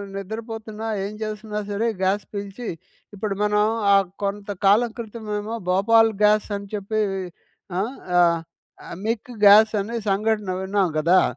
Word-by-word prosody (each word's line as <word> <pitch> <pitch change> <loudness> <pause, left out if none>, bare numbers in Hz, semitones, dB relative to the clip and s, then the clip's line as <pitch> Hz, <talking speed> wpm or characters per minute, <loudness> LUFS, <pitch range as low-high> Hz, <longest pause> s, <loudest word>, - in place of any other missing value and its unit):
నిద్రపోతున్నా, 220 +2 -6 0.2
ఏం 200 - -4
జేస్తున్నా 215 0 -4
సరే, 220 +3 0 0.2
గ్యాస్ 195 +1 +1
పీల్చి 200 +3 -6 0.5
ఇప్పుడు 200 0 -3
మనం 210 0 +2 0.3
ఆ - - +7 0.3
కొంత 200 +1 -3 0.2
కాలం 215 +5 +5
క్రితం 225 -1 -7
ఏమో 220 +2 -4
భోపాల్ 225 +4 +4
గ్యాస్ 210 0 +4
అని 200 0 -9
చెప్పి. 210 +1 -2 0.8
ఆహ్, 225 +8 -2 0.2
ఆహ్, 170 -1 +4 0.6
మిక్ 230 +2 -2
గ్యాస 215 +2 +8
అనే 230 +3 -6
సంఘటన 210 0 0
విన్నాం 195 -1 +1
గదా! 170 +4 +4
210 Hz, 130 wpm, -23 LUFS, 200-220 Hz, 0.8 s, గ్యాస